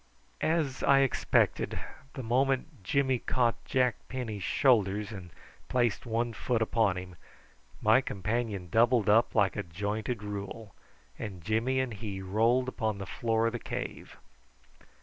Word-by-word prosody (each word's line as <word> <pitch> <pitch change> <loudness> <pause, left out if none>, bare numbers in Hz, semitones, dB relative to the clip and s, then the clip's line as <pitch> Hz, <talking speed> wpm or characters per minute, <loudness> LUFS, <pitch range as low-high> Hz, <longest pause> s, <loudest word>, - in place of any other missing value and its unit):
As 155 -5 0
I 135 0 +5
expected, 135 -3 +1 0.4
the 130 - -5
moment 130 0 0
Jimmy 130 +4 +1
caught 120 -2 0
Jack 125 -2 +2
Penny's 115 -6 -4
shoulders 105 -2 +2
and 95 -4 -8 0.4
placed 120 -3 +1
one 115 +1 -1
foot 120 +2 -1
upon 110 -4 +2
him 90 -1 -7 0.7
my 110 +5 +6
companion 105 -3 -2
doubled 115 -1 +4
up 110 +3 +4
like 100 -4 +3
a - - -1
jointed 105 +6 -3
rule, 105 +1 -6 0.5
and 95 -6 -6
Jimmy 115 +6 +1
and 130 -3 -1
he 100 -2 -5
rolled 115 +7 +2
upon 110 -5 -2
the 100 - -5
floor 115 +3 0
of 115 - 0
the 120 - -3
cave. - - -6
115 Hz, 140 wpm, -30 LUFS, 100-125 Hz, 0.7 s, my